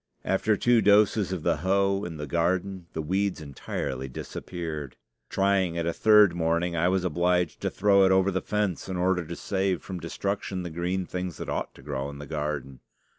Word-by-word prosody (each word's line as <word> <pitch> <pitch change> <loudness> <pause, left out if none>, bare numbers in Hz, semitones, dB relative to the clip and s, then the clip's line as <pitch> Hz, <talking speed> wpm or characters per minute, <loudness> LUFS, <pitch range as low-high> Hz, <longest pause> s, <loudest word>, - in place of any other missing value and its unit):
After 105 +2 +2
two 120 +1 +4
doses 105 -1 +4
of 90 -4 -3
the - - +2
hoe 100 +1 +1
in 85 -2 -6
the 75 - -4
garden 90 +3 -1
the 80 - -3
weeds 95 +4 0
entirely 65 -2 -4
disappeared. 75 +1 -6 0.3
Trying 95 -3 +1
it 85 -1 -1
a 85 - 0
third 105 -4 +6
morning, 85 +1 0
I 85 +1 +2
was 95 0 +1
obliged 90 -1 +1
to - - 0
throw 100 0 +4
it 95 - +4
over 95 +1 +4
the 95 0 -1
fence 105 -4 -2
in 95 - -2
order 90 0 +1
to 85 +2 -7
save 95 -2 -1
from 95 -2 -6
destruction 95 +2 -3
the 85 - -5
green 90 +3 -2
things 90 -1 -4
that - - -6
ought - - -3
to - - -15
grow 70 -1 -3
in 70 - -9
the 75 - -8
garden. 75 -4 -4
90 Hz, 195 wpm, -27 LUFS, 80-95 Hz, 0.3 s, third